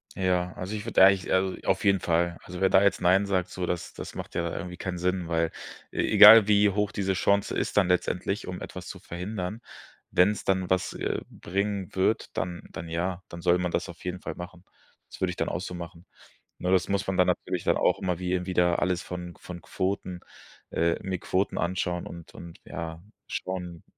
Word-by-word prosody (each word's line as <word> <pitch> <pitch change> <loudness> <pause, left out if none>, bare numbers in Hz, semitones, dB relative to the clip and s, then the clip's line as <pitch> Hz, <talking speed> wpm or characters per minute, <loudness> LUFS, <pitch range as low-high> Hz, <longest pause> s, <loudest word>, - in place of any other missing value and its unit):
Ja, 90 -1 0
also 95 +4 -5
ich 105 0 -5
würde 110 -4 +6
eigentlich 95 -2 +3
also 95 0 +2
auf 95 0 +1
jeden 100 -1 +4
Fall. 85 0 +1
Also 90 0 -8
wer 95 - +4
da 95 - +6
jetzt 100 0 +3
nein 95 +3 +3
sagt, 90 -2 0
so, 90 -1 -4
das 90 -1 -3
das - - -8
macht - - -7
ja 85 -1 -1
irgendwie 90 +1 -5
keinen 90 -1 -4
Sinn, 90 0 -1
weil 85 -1 0 0.4
e - - -11
egal 105 0 +9
wie 105 0 +5
hoch 105 +1 0
diese 95 -1 -1
Chance 100 +2 +1
ist - - -2
dann 95 -3 +4
letztendlich, 90 +2 0
um 90 0 -5
etwas 90 -1 -8
zu - - -7
verhindern, 90 +4 -5 0.5
wenn's 100 +2 +3
dann 95 -1 +1
was, 95 0 +1
äh, - - -2
bringen 100 0 -3
wird, 95 +4 0
dann 90 -1 -3
dann 80 +1 -7
ja, 85 +2 -2
dann 85 - -8
soll 90 +1 +4
man 90 -1 -1
das - - -1
auf - - -11
jeden 90 0 -4
Fall - - -5
machen. 90 +1 -10 0.4
Das - - -12
würde - - +2
ich - - -5
dann - - -1
auch 90 - -3
so 90 - -6
machen. 85 +1 -9 0.5
Ne, 90 - -2
das 95 -1 +3
muss 100 0 -1
man 95 -1 -1
dann 90 - +5
natürlich - - -1
dann - - +2
auch - - +3
immer 90 -2 -1
wie 90 0 -1
wieder 90 -2 +2
alles 90 -1 0
von 90 -1 -7
von 90 -1 -8
Quoten 95 -1 -3 0.5
äh, 85 0 +1
mir 95 -1 -3
Quoten 95 +3 -1
anschauen 90 0 -1
und 85 -1 -10
und 85 -1 -10
ja, 80 -1 -6 0.3
schauen, 90 -2 -5
90 Hz, 210 wpm, -27 LUFS, 90-95 Hz, 0.5 s, egal